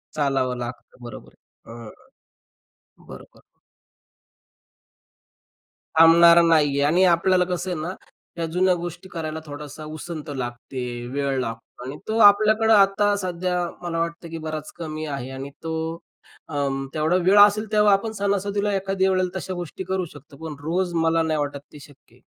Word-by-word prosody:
चालावं 135 Hz, -4 st, 0 dB
लागतं, 120 Hz, +1 st, -8 dB
बरोबर. 120 Hz, -2 st, -10 dB, 0.3 s
हं, 115 Hz, -1 st, -10 dB, 1.2 s
बरोबर. -, -, -13 dB, 2.6 s
थांबणारा 170 Hz, +1 st, +8 dB
नाही 165 Hz, -3 st, +4 dB
आहे. 140 Hz, 0 st, -1 dB
आणि 180 Hz, +3 st, +4 dB
आपल्याला 180 Hz, +1 st, +3 dB
कसं 180 Hz, 0 st, -3 dB
आहे 175 Hz, -, -3 dB
ना, 175 Hz, +4 st, -4 dB, 0.4 s
या 165 Hz, -, -1 dB
जुन्या 185 Hz, +1 st, +3 dB
गोष्टी 175 Hz, +2 st, -7 dB
करायला 160 Hz, -2 st, -5 dB
थोडासा 150 Hz, 0 st, -9 dB
उसंत 155 Hz, -2 st, -7 dB
लागते, 125 Hz, 0 st, -5 dB, 0.3 s
वेळ 135 Hz, +1 st, -1 dB
लागतो 115 Hz, 0 st, -7 dB
आणि 135 Hz, +3 st, -6 dB
तो 220 Hz, -, -1 dB
आपल्याकडे 215 Hz, +2 st, +2 dB
आता 205 Hz, 0 st, +4 dB
सध्या, 180 Hz, -1 st, -2 dB, 0.2 s
मला 170 Hz, -1 st, -3 dB
वाटतं, 170 Hz, 0 st, -4 dB
की 165 Hz, -, -6 dB
बराच 155 Hz, -1 st, -6 dB
कमी 155 Hz, -2 st, -5 dB
आहे. 135 Hz, -4 st, -5 dB
आणि 135 Hz, +1 st, -7 dB
तो 160 Hz, 0 st, -3 dB, 0.7 s
अं, 140 Hz, -2 st, -2 dB
तेवढा 155 Hz, +3 st, +1 dB
वेळ 190 Hz, +3 st, +4 dB
असेल 205 Hz, +1 st, +6 dB
तेव्हा 210 Hz, -1 st, +4 dB
आपण 200 Hz, +3 st, 0 dB
सणासुदीला 200 Hz, +1 st, 0 dB
एखाद्या 195 Hz, 0 st, 0 dB
वेळेला 185 Hz, -1 st, +1 dB
तशा 190 Hz, -, -5 dB
गोष्टी 175 Hz, +1 st, -6 dB
करू 185 Hz, 0 st, -2 dB
शकतो. 140 Hz, 0 st, -15 dB
पण 160 Hz, 0 st, -7 dB
रोज 175 Hz, +3 st, -1 dB
मला 165 Hz, 0 st, +2 dB
नाही 155 Hz, -1 st, -1 dB
वाटत 145 Hz, -1 st, -3 dB
ते 150 Hz, -, -11 dB
शक्य 145 Hz, -1 st, -18 dB
आहे. -, -, -25 dB
165 Hz, 150 wpm, -23 LUFS, 145-185 Hz, 2.6 s, थांबणारा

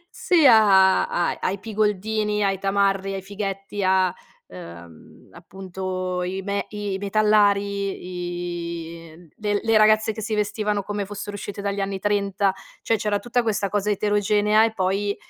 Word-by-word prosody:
sì, 335 Hz, -5 st, +3 dB
a 195 Hz, -5 st, +6 dB
a 175 Hz, -, -1 dB
a -, -, -6 dB
ai 190 Hz, +1 st, -1 dB
pigoldini, 210 Hz, 0 st, -1 dB
ai 195 Hz, -1 st, 0 dB
tamarri, 195 Hz, 0 st, 0 dB
ai 195 Hz, -, -4 dB
fighetti, 195 Hz, 0 st, -5 dB
a, 185 Hz, -1 st, +2 dB, 0.3 s
ehm, 85 Hz, -2 st, -13 dB
appunto, 185 Hz, 0 st, -5 dB
i 190 Hz, +2 st, -3 dB
me 200 Hz, +1 st, -2 dB
i 205 Hz, -2 st, -4 dB
metallari, 180 Hz, -5 st, -1 dB
i 165 Hz, +1 st, -17 dB
le 205 Hz, -1 st, -1 dB
le 225 Hz, -1 st, +3 dB
ragazze 215 Hz, 0 st, +4 dB
che 220 Hz, -, -7 dB
si 220 Hz, 0 st, -3 dB
vestivano 210 Hz, 0 st, -1 dB
come 205 Hz, 0 st, -3 dB
fossero 205 Hz, +1 st, -7 dB
uscite 200 Hz, 0 st, -6 dB
dagli 200 Hz, 0 st, -2 dB
anni 195 Hz, 0 st, -3 dB
‘30. 200 Hz, -1 st, 0 dB
Cioè,: 225 Hz, +3 st, -4 dB
c'era 205 Hz, 0 st, -1 dB
tutta 240 Hz, +2 st, 0 dB
questa 205 Hz, -3 st, -1 dB
cosa 210 Hz, +1 st, 0 dB
eterogenea 210 Hz, +1 st, +2 dB
e 225 Hz, -, -2 dB
poi 200 Hz, +1 st, -1 dB
200 Hz, 150 wpm, -23 LUFS, 190-210 Hz, 0.3 s, a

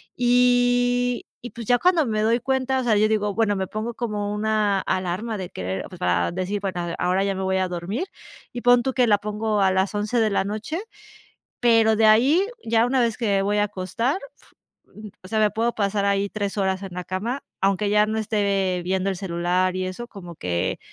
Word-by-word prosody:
y 245 Hz, 0 st, +2 dB, 0.2 s
y 245 Hz, -, -8 dB
pues, 230 Hz, -2 st, -9 dB
ya 245 Hz, -, +4 dB
cuando 345 Hz, -5 st, +3 dB
me 215 Hz, -1 st, 0 dB
doy 230 Hz, +2 st, +2 dB
cuenta, 265 Hz, +1 st, 0 dB
o -, -, -2 dB
sea, 225 Hz, -3 st, +2 dB
yo 215 Hz, +1 st, +4 dB
digo 210 Hz, -2 st, 0 dB
bueno, 215 Hz, -2 st, +1 dB
me 190 Hz, -1 st, -2 dB
pongo 220 Hz, +2 st, -4 dB
como 210 Hz, -3 st, -3 dB
una 210 Hz, -2 st, +1 dB
alarma 190 Hz, +5 st, -2 dB
de 180 Hz, -, -5 dB
querer, 95 Hz, +1 st, -4 dB
pues -, -, -11 dB
para 90 Hz, -, +1 dB
decir: 185 Hz, +3 st, -2 dB
"Bueno, 180 Hz, -3 st, -3 dB
eh, -, -, -4 dB
ahora 185 Hz, +2 st, +1 dB
ya 200 Hz, 0 st, 0 dB
me 190 Hz, -, -4 dB
voy 190 Hz, 0 st, 0 dB
a 185 Hz, 0 st, +1 dB
dormir", 180 Hz, -, -3 dB, 0.5 s
y 240 Hz, -, -5 dB
pon 245 Hz, 0 st, +5 dB
tú 265 Hz, -, -1 dB
que 250 Hz, -2 st, +3 dB
la 205 Hz, -1 st, +5 dB
pongo 210 Hz, 0 st, -1 dB
a 190 Hz, -1 st, +4 dB
las 190 Hz, +2 st, 0 dB
11:00 210 Hz, +3 st, 0 dB
de 220 Hz, -1 st, +3 dB
la 195 Hz, -, +1 dB
noche, 215 Hz, -, -4 dB, 0.8 s
pero 225 Hz, -2 st, +4 dB
de 220 Hz, 0 st, +3 dB
ahí 275 Hz, -, +4 dB, 0.2 s
ya 230 Hz, 0 st, +2 dB
una 260 Hz, 0 st, +1 dB
vez 230 Hz, -2 st, +1 dB
que 230 Hz, -3 st, -2 dB
me 195 Hz, -1 st, +2 dB
voy 205 Hz, +1 st, 0 dB
a 205 Hz, -, +3 dB
acostar, 210 Hz, -, -2 dB, 0.8 s
mm, 215 Hz, -1 st, -9 dB
o 185 Hz, -, -10 dB
sea, 220 Hz, -, -1 dB
me 210 Hz, -1 st, +3 dB
puedo 230 Hz, +2 st, -1 dB
pasar 200 Hz, -1 st, 0 dB
ahí 200 Hz, 0 st, +1 dB
3 205 Hz, 0 st, -4 dB
horas 190 Hz, -1 st, 0 dB
en 190 Hz, -2 st, -7 dB
la 180 Hz, -, -5 dB
cama, 225 Hz, +9 st, -3 dB, 0.2 s
aunque 195 Hz, +1 st, +1 dB
ya 210 Hz, 0 st, +4 dB
no 220 Hz, -, -2 dB
esté 200 Hz, -4 st, 0 dB
viendo 190 Hz, +1 st, 0 dB
el 190 Hz, -, -4 dB
celular 180 Hz, 0 st, 0 dB
y 185 Hz, -, -2 dB
eso, 240 Hz, +6 st, -6 dB
como 175 Hz, -6 st, -10 dB
que, 85 Hz, -, -2 dB
210 Hz, 220 wpm, -23 LUFS, 190-235 Hz, 0.8 s, pon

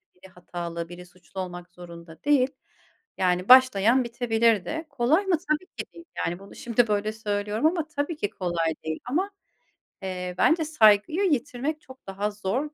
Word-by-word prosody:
biri 185 Hz, +1 st, -16 dB
hatalı, 170 Hz, -1 st, -6 dB
biri 180 Hz, 0 st, -10 dB
suçlu, 180 Hz, +1 st, -12 dB
olmak 175 Hz, -1 st, -7 dB
zorunda 170 Hz, -2 st, -12 dB
değil. 275 Hz, -3 st, +3 dB, 0.7 s
Yani, 180 Hz, +1 st, +1 dB
başlayan 255 Hz, -1 st, +7 dB
bitebilirde. 235 Hz, -, +1 dB
Kolay 280 Hz, +8 st, +2 dB
mı? 365 Hz, -4 st, +2 dB
Tabii 305 Hz, +4 st, +1 dB
ki -, -, -3 dB
değil, 335 Hz, -, -13 dB
yani, 175 Hz, +1 st, -2 dB
bunu, 195 Hz, 0 st, -13 dB
şimdi, 235 Hz, 0 st, +1 dB
böyle 210 Hz, 0 st, 0 dB
söylüyorum 210 Hz, +3 st, -2 dB
ama, 325 Hz, -1 st, +2 dB
tabii 300 Hz, +2 st, -3 dB
ki 205 Hz, -, -1 dB
kolay 170 Hz, -3 st, -1 dB
değil, 160 Hz, 0 st, -3 dB
ama, 365 Hz, +11 st, -1 dB, 0.7 s
eee, 180 Hz, -1 st, -4 dB
bence 320 Hz, -, +3 dB
saygıyı 235 Hz, -, +4 dB
yitirmek 285 Hz, +3 st, -2 dB
çok 260 Hz, -4 st, -16 dB
daha 200 Hz, +2 st, -2 dB
zor 220 Hz, +9 st, -3 dB
215 Hz, 155 wpm, -26 LUFS, 180-285 Hz, 0.7 s, başlayan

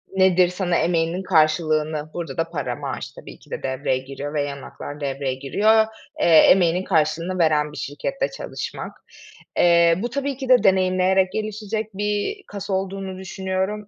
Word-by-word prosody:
Nedir? 185 Hz, -1 st, +5 dB
Sana 180 Hz, -1 st, -1 dB
emeğinin 170 Hz, +2 st, 0 dB
karşılığını, 155 Hz, -2 st, +1 dB
burada 165 Hz, -5 st, -5 dB
da 165 Hz, 0 st, -1 dB
para, 145 Hz, -5 st, -3 dB
maaş -, -, -5 dB
tabii -, -, -12 dB
ki -, -, -21 dB
de -, -, -5 dB
devreye 130 Hz, 0 st, -1 dB
giriyor 135 Hz, +3 st, -7 dB
ve 145 Hz, -1 st, 0 dB
yan 140 Hz, -1 st, -5 dB
haklar 145 Hz, +2 st, -9 dB
devreye 135 Hz, -1 st, -2 dB
giriyor, 215 Hz, +11 st, +3 dB, 0.3 s
eee, -, -, +2 dB
emeğinin 175 Hz, +2 st, +5 dB
karşılığını 165 Hz, +2 st, 0 dB
veren 150 Hz, -2 st, +2 dB
bir -, -, -11 dB
şirkette -, -, -3 dB
çalışmak. -, -, -6 dB, 0.7 s
Eee, 170 Hz, -1 st, +5 dB
bu 240 Hz, -, -2 dB
tabii 280 Hz, 0 st, -3 dB
ki 265 Hz, -2 st, -6 dB
de 250 Hz, -1 st, +6 dB
deneyimleyerek 185 Hz, 0 st, +3 dB
gelişecek 215 Hz, 0 st, -3 dB
bir 210 Hz, -, -2 dB
kas 200 Hz, -1 st, -7 dB
olduğunu 190 Hz, 0 st, -3 dB
düşünüyorum 190 Hz, +2 st, -3 dB
180 Hz, 155 wpm, -22 LUFS, 155-195 Hz, 0.7 s, de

